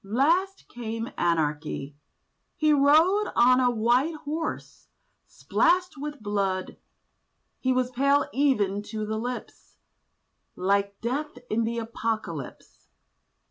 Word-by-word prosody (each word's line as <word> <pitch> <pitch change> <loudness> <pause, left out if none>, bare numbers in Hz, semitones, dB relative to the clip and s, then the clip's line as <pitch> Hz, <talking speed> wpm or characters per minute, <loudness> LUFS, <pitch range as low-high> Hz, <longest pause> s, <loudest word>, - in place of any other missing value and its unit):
Last 325 - +1
came 230 -1 -5
Anarchy: 150 -4 -1 0.6
he 310 -1 +3
rode 315 +9 +4
On 250 +1 +5
a 250 -1 +3
white 245 +7 +2
horse, 310 +1 -5 0.4
splashed 360 +1 +1
with 290 -3 -7
blood; 195 -2 -2 0.8
He 260 - 0
was 255 -1 +1
pale 275 +3 +3
even 210 -8 +1
to 215 +1 -5
the 220 +1 -3
lips, 245 +2 -7 0.8
Like 200 +1 0
Death 275 +4 -3
in 225 +1 +1
the 235 +1 -2
Apocalypse. 220 - -5
240 Hz, 105 wpm, -26 LUFS, 205-285 Hz, 0.8 s, On